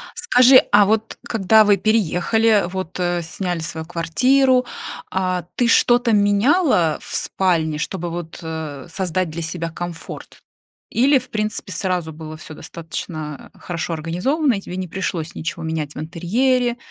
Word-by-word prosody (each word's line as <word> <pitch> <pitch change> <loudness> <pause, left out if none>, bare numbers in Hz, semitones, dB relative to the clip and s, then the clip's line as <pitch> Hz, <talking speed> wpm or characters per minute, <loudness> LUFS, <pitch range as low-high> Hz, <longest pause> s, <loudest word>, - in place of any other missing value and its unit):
Скажи, 260 -8 +6
а 205 0 +6
вот 220 +2 0
когда 220 0 +4
вы 205 -1 +4
переехали, 215 +1 +2
вот, 185 -1 -5
э, 175 -1 0
сняли 175 +1 -3
свою 160 0 -5
квартиру, 250 +11 +2 0.4
а, 185 -1 -1
ты 245 - +2
что-то 240 0 +4
меняла 205 - +3
в - - -7
спальне, 165 -5 0
чтобы, 175 +3 -3
вот, 170 -1 -6
э, 160 -4 -6
создать 185 0 -1
для 165 +2 -5
себя 165 +1 -3
комфорт? 170 0 -8 0.5
Или, 270 +4 +4
в 255 0 -13
принципе, 215 -2 -3
сразу 180 -2 -1
было 155 0 -9
всё 155 - -10
достаточно, 155 -2 -7
э, - - -20
хорошо 170 -1 -4
организовано, 190 - 0
и 195 - -4
тебе 180 - -7
не 185 -1 -3
пришлось 170 -3 -3
ничего 165 +1 -4
менять 160 -2 -3
в - - -6
интерьере, 235 +10 0
180 Hz, 150 wpm, -20 LUFS, 165-220 Hz, 0.5 s, Скажи